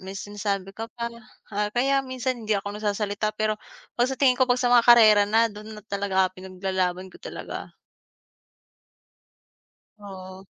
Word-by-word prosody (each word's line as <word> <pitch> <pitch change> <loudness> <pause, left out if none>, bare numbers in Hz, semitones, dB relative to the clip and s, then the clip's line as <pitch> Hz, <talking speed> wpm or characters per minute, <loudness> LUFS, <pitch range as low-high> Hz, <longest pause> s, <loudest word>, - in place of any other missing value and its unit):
may 190 +1 -8
sinasabi 200 -1 -3
ka 225 +2 -6
pa." 235 0 -3 0.4
Ah, 205 +1 0
kaya 275 +3 +2
minsan 255 -1 -3
hindi 215 - +2
ako 200 +1 -4
nagsasalita 210 0 -2
pero 215 0 0 0.4
'pag 245 - +4
sa 265 - -2
tingin 255 -1 +4
ko 260 - +5
'pag 245 0 +2
sa 245 - +2
mga 240 -1 +5
karera 215 -3 +8
na 225 +2 +3
do'n 215 +1 -10
na 210 - -11
talaga 195 -2 0
pinaglalaban 185 0 -3
ko - - -14
talaga. - - -7 2.3
Oo. 190 -1 -10
210 Hz, 155 wpm, -25 LUFS, 195-235 Hz, 2.3 s, karera